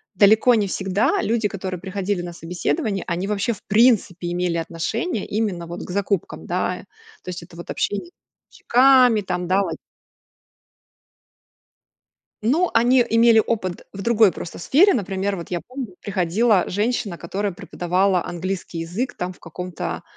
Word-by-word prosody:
далеко 215 +5 +5
не 210 -3 +1
всегда 200 - 0
люди, 225 -1 +1
которые 185 -2 -5
приходили 195 0 -2
на 175 -1 -6
собеседование, 195 - -2
они, 180 +2 -2
вообще, 210 +2 0
в 205 - -14
принципе, 205 -6 +3
имели 175 -1 -1
отношение 170 - -3
именно 200 -6 -2
вот 175 +1 -6
к - - -8
закупкам, 200 -1 -2
да, 180 +1 -2 0.4
то - - -7
есть 180 -1 -6
это 170 0 -15
вот 170 - -9
общение 205 - -2
с 350 - -19 0.5
поставщиками, 250 -3 +5
там 180 -2 -3
да 190 +2 +3
вот. - - -3 2.7
Ну 320 +10 +2
они 245 +2 +5
имели 230 0 +5
опыт 185 -6 -3
в 195 - -7
другой 220 -3 +4
просто 165 - -8
сфере, 345 - +4
например, 195 -1 -1
вот 170 - -8
я 175 - -1
помню 250 - -7
приходила 200 +1 +2
женщина, 210 -1 -1
которая 195 +4 -3
преподавала 180 +1 0
английский 180 0 -4
язык 180 +10 -3
там 180 +1 -3
в - - -20
каком-то 180 +1 -6
195 Hz, 150 wpm, -22 LUFS, 180-225 Hz, 2.7 s, далеко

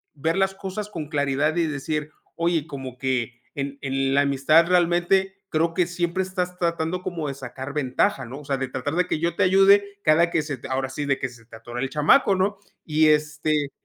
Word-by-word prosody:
ver 160 +4 -1
las 195 0 +1
cosas 195 +2 -5
con 160 -7 -6
claridad 145 0 0
y 170 -1 +2
decir: 150 +1 -3 0.2
"Oye, 170 -2 0
como 135 -5 -7
que, 125 -2 -2
en 140 0 -4
en 135 0 0
la 140 - +5
amistad 145 +4 +4
realmente 180 +2 +2 0.2
creo 165 0 +1
que 180 - +3
siempre 175 +1 -1
estás 180 -1 -3
tratando 170 +1 -1
como 165 -5 -3
de - - -3
sacar 135 +1 -7
ventaja, 135 -2 0
¿no? 130 +4 -8
O - - -15
sea, 140 -1 -1
de 135 0 -2
tratar 130 +4 -3
de 180 0 +1
que - - 0
yo 170 +1 0
te - - +2
ayude 200 +2 +4
cada 165 +2 +4
que 165 - +2
se 145 -2 -4
te - - -9
ahora 130 0 -1
sí, 145 +2 -4
de 135 -1 +1
que 130 - -2
se 120 -2 -16
te 115 - -13
atore 120 +2 -7
el 135 - -2
chamaco", 160 - +4
¿no? 195 +2 0 0.3
Y, 155 0 +3
este, 150 -1 +1
155 Hz, 215 wpm, -24 LUFS, 135-175 Hz, 0.3 s, la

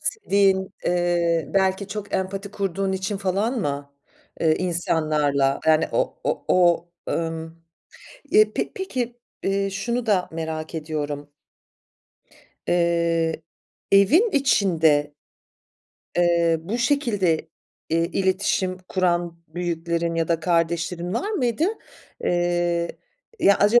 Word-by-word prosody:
sevdiğin, 195 - +1
eee, 170 -3 +1
belki 190 0 +1
çok 205 0 -6
empati 195 +1 -2
kurduğun 195 -1 -2
için 190 +2 -2
falan 200 +6 0
mı, 140 -4 -4 0.5
eee, 160 -1 +3
insanlarla? 155 -6 +1
Yani 160 0 +4
o - - 0
o - - -1
o 175 -1 +3 0.2
ımm 165 0 -4 0.7
Eee, 430 +1 +5
pe - - -2
peki, 245 -10 -3 0.2
eee, 195 0 0
şunu 235 +5 -2
da 195 -5 +1
merak 160 0 -4
ediyorum. 150 -2 -4 1.4
Eee, 170 -2 +1 0.5
evin 290 - +5
içinde 165 - +3 1.0
eee, 170 -1 +3
bu 205 +8 -3
şekilde, 215 - +1 0.4
eee, 165 +1 +2
iletişim 185 0 0
kuran 175 -2 0
büyüklerin 170 0 -2
ya 165 -1 0
da 165 -1 +1
kardeşlerin 170 +1 0
var 405 - -1
mıydı? 260 - 0 0.6
Eee, 175 -1 0 0.4
ya, 200 -10 +5
acaba, 210 +4 +5
175 Hz, 105 wpm, -23 LUFS, 165-200 Hz, 1.4 s, Eee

